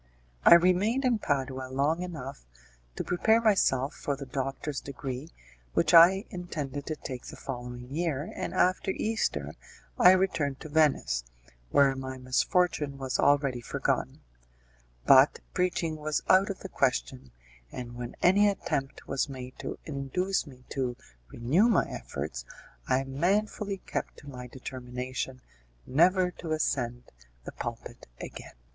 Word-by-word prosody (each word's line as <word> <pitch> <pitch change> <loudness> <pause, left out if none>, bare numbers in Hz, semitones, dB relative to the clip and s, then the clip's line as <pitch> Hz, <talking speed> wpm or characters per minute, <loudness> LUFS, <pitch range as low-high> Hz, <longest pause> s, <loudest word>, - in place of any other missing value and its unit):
I - - +10
remained 190 +9 +3
in 240 -3 +2
Padua 130 -5 -2
long 145 +6 +1
enough 140 - -7 0.5
to - - -3
prepare 220 +6 +3
myself 170 - +2
for 140 - -3
the 140 0 -7
doctor's 135 +2 -3
degree, 135 +1 -6 0.5
which 160 0 +2
I 180 +4 +8
intended 150 -6 -5
to 155 - -2
take 130 -4 -7
the - - -8
following 125 -1 -7
year, 160 -2 -2
and - - -3
after 185 +2 +2
Easter 220 +3 -1 0.5
I 180 0 +9
returned 160 -8 0
to 155 - -8
Venice, 145 - +2 0.5
where 135 - +4
my 130 0 -6
misfortune 140 +3 +1
was 135 -1 -2
already 140 -4 +3
forgotten; - - -2 0.8
but - - +6
preaching 170 -3 0
was 150 -1 -2
out 190 +2 +5
of 195 - -5
the 190 - -7
question, 130 - -1 0.4
and 120 -1 -7
when 120 0 -7
any 200 +3 +6
attempt 135 -8 -3
was 135 - -1
made 130 -1 -8
to - - -5
induce 155 +6 -1
me 130 -2 -14
to 125 -3 -2 0.3
renew 155 - +3
my 230 - +3
efforts, 70 -3 -5 0.4
I 130 +1 +2
manfully 195 +8 0
kept - - -4
to 145 - -14
my 125 -3 -8
determination 125 0 -6 0.4
never 180 +6 +3
to 160 -2 -3
ascend 125 -5 -2 0.3
the - - -7
pulpit - - -7
again. - - -9
140 Hz, 140 wpm, -29 LUFS, 130-180 Hz, 0.8 s, I